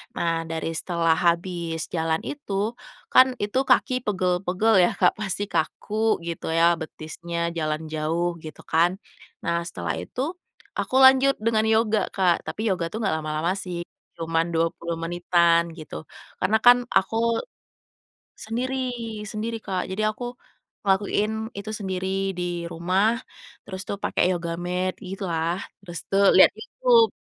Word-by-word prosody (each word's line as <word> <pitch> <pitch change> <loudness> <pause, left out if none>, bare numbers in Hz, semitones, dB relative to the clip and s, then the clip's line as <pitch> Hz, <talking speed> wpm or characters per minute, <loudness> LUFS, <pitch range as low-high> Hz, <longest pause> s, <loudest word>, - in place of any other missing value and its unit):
Nah 170 -1 0 0.2
dari 160 0 -3
setelah 165 -2 +1
habis 170 -1 0 0.2
jalan 160 -1 0
itu, 285 -8 -6 0.6
kan 260 - +8 0.2
itu 205 +4 -2
kaki - - +4
pegel-pegel 185 +2 +1
ya - - +2
Kak, 180 - +5
pasti 205 -1 -2
kaku 210 - -2 0.3
gitu 170 - -5
ya 165 - +4 0.2
betisnya 160 +2 -7 0.2
jalan 155 -1 -1
jauh 160 +3 0
gitu 155 -1 -9
kan, 165 +2 +5 0.5
nah 170 0 0
setelah 85 - -3
itu 250 - -5 0.6
aku - - -4
lanjut 265 +1 +6
dengan 220 -1 +3
yoga 220 -1 +3
Kak, 180 -3 +2
tapi - - -4
yoga 180 -4 0
tuh - - -4
nggak 195 -8 0
lama-lama 155 +2 -1
sih, 180 -2 -5 0.4
cuman 165 0 +1
20 165 +1 -1
menitan 170 0 +3
gitu, 155 -2 -9 0.4
karena 220 - +3
kan 245 0 +9 0.2
aku 190 +3 0 1.3
sendiri, 245 +4 -2 0.6
sendiri 220 +2 -3
Kak. 185 -2 -1
Jadi 195 +3 -2
aku 215 +3 -6 0.6
ngelakuin 205 +1 +1 0.3
itu 205 +2 -6
sendiri 190 -2 -3 0.3
di - - -1 0.3
rumah 185 +4 +1 0.6
terus 190 0 -7
tuh 200 - -3
pakai - - +1
yoga 170 -2 -2
mat 180 +1 -1 0.2
gitu 195 +1 -5
lah, 165 +1 0 0.3
terus 175 -4 -7
tuh 195 +1 +3
lihat - - +9
YouTube, 485 -2 +3
180 Hz, 140 wpm, -25 LUFS, 165-210 Hz, 1.3 s, kan